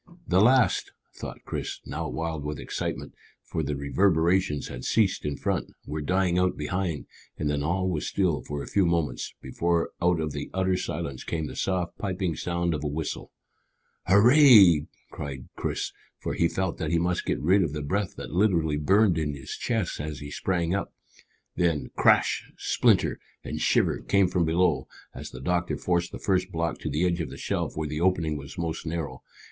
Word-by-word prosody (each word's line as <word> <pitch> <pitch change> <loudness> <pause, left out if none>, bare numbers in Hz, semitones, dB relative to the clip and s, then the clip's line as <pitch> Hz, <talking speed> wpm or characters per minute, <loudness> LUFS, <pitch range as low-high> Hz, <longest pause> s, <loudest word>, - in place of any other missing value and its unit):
"The 90 +1 +4
last!" 125 +2 +4 0.2
thought - - -8
Chris, - - -4
now - - -4
wild 80 -2 -3
with 75 +1 -4
excitement, - - -4 0.3
for 80 - -3
the 75 -1 -2
reverberations 80 +2 +2
had 60 0 -7
ceased 105 -8 +1
in 75 -1 -2
front, - - -2
were 75 +2 -4
dying 90 +2 +1
out 90 0 +1
behind, 85 +1 -2 0.3
and 75 -1 -1
then 70 -1 -1
all 90 +5 0
was 85 -5 -1
still 90 -7 +1
for 75 -1 -5
a - - -9
few 100 -3 +2
moments, 85 -3 -1
before 85 +5 0
out 90 -1 +3
of 75 -1 -2
the - - -5
utter 95 -1 +2
silence 70 -7 -4
came 80 -2 -2
the 65 -3 -7
soft 90 +1 -2
piping 95 -4 -2
sound 85 +1 -1
of 75 -1 -3
a - - 0
whistle. 75 +2 -4 0.8
"Hurrah!" 100 - +7 0.2
cried 65 -3 -7
Chris, - - -2 0.3
for - - -4
he 85 - +2
felt 95 0 -2
that 80 - -1
he 85 - +2
must 90 +2 0
get - - 0
rid 95 +6 +4
of 80 -5 0
the 75 -1 -4
breath 95 +6 -1
that - - -7
literally 85 -5 +2
burned 95 +3 +3
in 75 -2 -2
his 70 - -9
chest 115 -7 -2
as 75 0 -4
he 70 +3 -8
sprang 85 -1 -1
up. 100 -1 -3 0.6
Then 80 -7 0
crash, - - +3
splinter, - - +2 0.2
and - - -4
shiver - - +2
came 100 -2 +2
from 90 -2 +1
below 80 -4 +2 0.3
as - - -7
the 65 - -10
doctor 85 +4 0
forced 85 -1 0
the - - -6
first 95 -1 0
block 85 -1 -2
to 80 - -4
the 75 +5 +1
edge 85 -1 +1
of 80 - -4
the - - -9
shelf - - -2
where 80 0 -1
the 75 +2 -3
opening 85 -4 +2
was 70 -1 -8
most 85 -1 -3
narrow. 80 -2 -4
85 Hz, 190 wpm, -27 LUFS, 75-95 Hz, 0.8 s, Hurrah